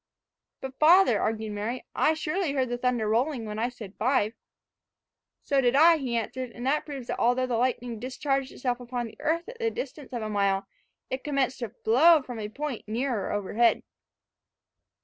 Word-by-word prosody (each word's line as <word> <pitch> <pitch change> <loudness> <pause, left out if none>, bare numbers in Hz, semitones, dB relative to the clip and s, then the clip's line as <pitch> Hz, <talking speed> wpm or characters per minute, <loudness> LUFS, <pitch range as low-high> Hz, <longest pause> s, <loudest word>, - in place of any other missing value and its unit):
"But, 265 0 -7
father," 315 - +6
argued 220 -1 -1
Mary, 215 +5 -4
"I 315 - +2
surely 315 0 -1
heard 260 -3 0
the 245 - -2
thunder 245 -3 0
rolling 240 +3 0
when 210 0 -5
I 235 +2 0
said 220 -6 -10
five." 225 -2 +2 1.1
"So 275 -1 +2
did 245 0 +2
I," 325 +3 +7
he 250 -5 -2
answered; 250 +3 -3
"and 240 - -6
that 295 +4 +1
proves 275 -4 -6
that - - -4
although 245 +2 +2
the 250 -2 -1
lightning 240 -1 -1
discharged 270 +2 -2
itself 250 -1 -2
upon 245 0 -4
the 225 - -11
earth 335 +3 0
at 480 0 -10
the 460 -1 +1
distance 450 - -7
of 240 -3 -4
a - - -3
mile, 200 -2 +1 0.5
it 260 0 -3
commenced 275 -3 0
to 235 -3 -4
flow 275 +8 +4
from 245 -3 -7
a 210 -1 -4
point 275 -1 -5
nearer 230 -1 -1
overhead." 205 +3 +2
250 Hz, 185 wpm, -27 LUFS, 225-280 Hz, 1.1 s, I